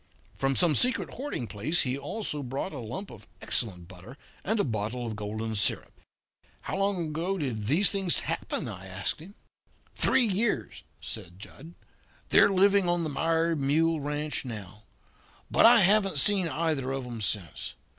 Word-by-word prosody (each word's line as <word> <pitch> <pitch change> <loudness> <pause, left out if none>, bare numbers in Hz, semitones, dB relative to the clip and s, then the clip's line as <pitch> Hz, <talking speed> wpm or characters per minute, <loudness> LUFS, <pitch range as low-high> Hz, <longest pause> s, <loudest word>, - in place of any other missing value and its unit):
From 135 0 0
some 170 0 +5
secret 250 - +2
hoarding 260 - -4
he 130 +5 0
also 150 +2 -4
brought 135 +6 -4
a 140 - -6
lump 125 - -6
of 110 -3 -13
excellent 90 -7 -2
butter 95 +8 -13 0.3
and 220 +3 0
a - - +3
bottle 115 +1 -3
of 110 -2 -4
golden 110 +2 -4
syrup. 105 -1 +1 0.7
"How - - -4
long 195 -5 0
ago 170 +6 -2
did 120 - -3
these 170 - +4
things 195 -4 +1
happen?" 165 -2 -3
I 95 -4 -7
asked 95 +7 -2
him. 190 +6 -13 0.6
"Three 250 - +3
years," 215 +2 -1 0.2
said 85 +2 -7
Jud. 155 - -12 0.5
"They're - - +6
living 195 -1 +3
on 175 -1 +1
the 155 - -2
Mired 165 +1 0
Mule 160 +4 +2
Ranch 150 +1 -3
now. 105 -4 -9 0.7
But - - +6
I 235 -1 +7
haven't 195 -3 +3
seen 190 +4 +4
either 155 -4 -1
of 135 -1 -3
'em 120 -2 -7
since. 95 -6 -3
145 Hz, 160 wpm, -28 LUFS, 115-185 Hz, 0.7 s, I